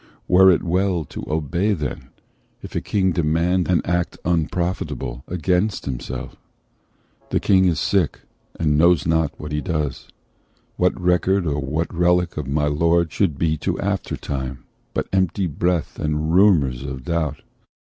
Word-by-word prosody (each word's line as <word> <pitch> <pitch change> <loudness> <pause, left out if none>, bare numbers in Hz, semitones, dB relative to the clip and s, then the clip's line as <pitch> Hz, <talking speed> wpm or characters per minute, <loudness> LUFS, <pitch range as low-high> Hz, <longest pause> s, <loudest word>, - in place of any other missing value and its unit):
Were 95 +1 +7
it 90 - +3
well 90 -1 0
to - - -8
obey 85 +7 0
then, 75 -7 -5 0.5
if - - -9
a - - -1
king 95 -3 +1
demand 85 +2 +1
An 90 -3 +2
act 90 0 -1
unprofitable, 80 -7 -2
against 90 +4 0
himself? 65 -1 -5 0.9
The - - +1
King 95 -2 +4
is 85 -4 +2
sick, 95 -6 0 0.4
and 75 -2 +2
knows 85 -1 +4
not 80 -2 +2
what 75 -1 -7
he 75 0 -1
does. 75 -7 -3 0.7
What 90 +1 +1
record, 90 +1 +2
or 75 -2 -1
what 75 +5 -2
relic 90 0 +2
of 75 -4 -4
my 75 +2 +1
lord 85 +2 +2
Should 85 -9 0
be 80 0 +1
to - - -2
aftertime, 70 -9 -3 0.3
but - - -1
empty 95 0 +1
breath 85 +1 -1
And 75 +1 -1
rumours 80 -10 +4
of 65 -1 -5
a - - -11
doubt? 80 +1 -2
85 Hz, 150 wpm, -22 LUFS, 75-90 Hz, 0.9 s, Were